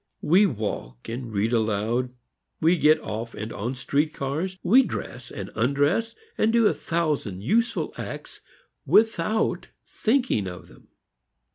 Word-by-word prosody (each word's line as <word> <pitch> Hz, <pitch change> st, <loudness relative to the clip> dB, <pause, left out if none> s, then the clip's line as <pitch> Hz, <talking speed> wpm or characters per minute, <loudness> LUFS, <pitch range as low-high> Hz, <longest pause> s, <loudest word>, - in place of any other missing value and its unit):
We 190 Hz, +6 st, +5 dB
walk 100 Hz, -, -5 dB
and 120 Hz, 0 st, -5 dB
read 110 Hz, +3 st, 0 dB
aloud, 115 Hz, +3 st, 0 dB, 0.5 s
we 165 Hz, +3 st, +4 dB
get 155 Hz, -2 st, +4 dB
off 115 Hz, +2 st, -5 dB
and 110 Hz, +2 st, -5 dB
on 120 Hz, +6 st, -3 dB
street 145 Hz, +4 st, 0 dB
cars, 160 Hz, +8 st, -3 dB
we 230 Hz, +9 st, +6 dB
dress 125 Hz, -, -5 dB
and 100 Hz, -2 st, -7 dB
undress, 145 Hz, -, +1 dB, 0.2 s
and 220 Hz, -, +3 dB
do 230 Hz, -1 st, +4 dB
a -, -, +4 dB
thousand 150 Hz, -, -2 dB
useful 230 Hz, -, +1 dB
acts -, -, -7 dB, 0.4 s
without 220 Hz, -1 st, +2 dB, 0.2 s
thinking 230 Hz, -, 0 dB
of 90 Hz, -1 st, -9 dB
them. -, -, -19 dB
140 Hz, 135 wpm, -25 LUFS, -, 0.5 s, we